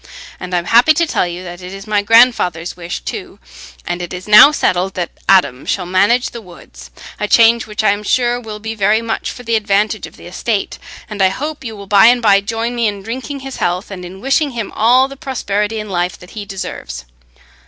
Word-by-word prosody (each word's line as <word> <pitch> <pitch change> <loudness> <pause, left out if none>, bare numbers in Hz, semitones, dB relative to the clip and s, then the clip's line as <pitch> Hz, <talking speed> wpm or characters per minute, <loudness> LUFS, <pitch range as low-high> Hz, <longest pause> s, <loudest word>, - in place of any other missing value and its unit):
And 180 0 -4
I - - +3
am 175 - -2
happy 240 - +5
to 335 - +2
tell 240 - 0
you 175 +1 -6
that 175 0 -9
it 180 0 -8
is 195 0 -10
my 210 -1 +1
grandfather's 205 -7 +3
wish 175 -1 -6
too, 375 -4 -7 0.5
and 175 0 -3
it 175 - -6
is 180 +2 -9
now 210 +7 +9
settled 190 -9 0
that 175 -2 -3 0.2
Adam 180 -10 +3
shall 185 - -2
manage 200 +8 +2
the 235 - -8
woods—a 65 - -10
change 230 +1 +4
which 210 0 -3
I 205 - +4
am 205 +1 -2
sure 245 +2 0
will 215 -2 -7
be 220 +1 -5
very 215 +1 +1
much 225 -1 -3
for 245 - -9
the 230 -1 0
advantage 210 0 0
of - - -17
the - - -14
estate; 195 +4 -3 0.3
and 210 -2 -5
I 190 - +5
hope 295 +9 -5
you 225 -3 -6
will 200 -1 -10
by 200 +2 +6
and 245 +1 +5
by 200 -4 +4
join 225 +3 -3
me 235 -2 0
in 200 -2 -4
drinking 260 +5 -6
his 270 -1 -7
health, 180 +3 -2
and 185 -2 -7
in 185 +2 -10
wishing 275 +4 +1
him 220 -3 -4
all 245 +4 +3
the 275 - -10
prosperity 220 -5 -3
in 210 - -6
life 180 -2 -2
that 180 - -15
he 210 -2 -7
deserves. 65 - -7
210 Hz, 225 wpm, -16 LUFS, 185-235 Hz, 0.5 s, now